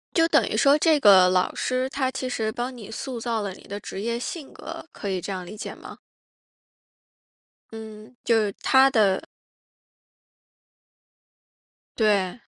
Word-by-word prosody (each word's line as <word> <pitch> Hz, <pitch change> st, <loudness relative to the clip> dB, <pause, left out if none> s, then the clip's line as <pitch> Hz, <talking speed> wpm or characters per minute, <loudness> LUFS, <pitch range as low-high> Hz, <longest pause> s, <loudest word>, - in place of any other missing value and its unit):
就 330 Hz, -1 st, +4 dB
等 -, -, +3 dB
于 -, -, -2 dB
说 280 Hz, +1 st, +5 dB
这 310 Hz, -1 st, +3 dB
个 190 Hz, -6 st, +7 dB
老 180 Hz, 0 st, +1 dB
师， 255 Hz, 0 st, -1 dB
他 270 Hz, -1 st, -1 dB
其 260 Hz, 0 st, -4 dB
实 220 Hz, -3 st, -2 dB
帮 250 Hz, +2 st, -4 dB
你 220 Hz, -4 st, -10 dB
塑 245 Hz, +2 st, -5 dB
造 230 Hz, -1 st, -2 dB
了 200 Hz, -2 st, -4 dB
你 -, -, -15 dB
的 200 Hz, +1 st, -7 dB
职 195 Hz, -, -7 dB
业 235 Hz, +2 st, -2 dB
性 290 Hz, +3 st, -6 dB
格， -, -, -9 dB
可 -, -, -7 dB
以 185 Hz, -2 st, -2 dB
这 200 Hz, -, -5 dB
样 185 Hz, -2 st, -5 dB
理 195 Hz, +4 st, -9 dB
解 210 Hz, -, -6 dB
吗？ -, -, -12 dB, 1.7 s
嗯， 220 Hz, +1 st, -10 dB
就 230 Hz, -, +3 dB
是 215 Hz, -2 st, +1 dB
他 265 Hz, 0 st, +5 dB
的 210 Hz, -7 st, +2 dB, 2.8 s
对。 205 Hz, -2 st, +1 dB
225 Hz, 170 characters per minute, -24 LUFS, 200-260 Hz, 2.8 s, 个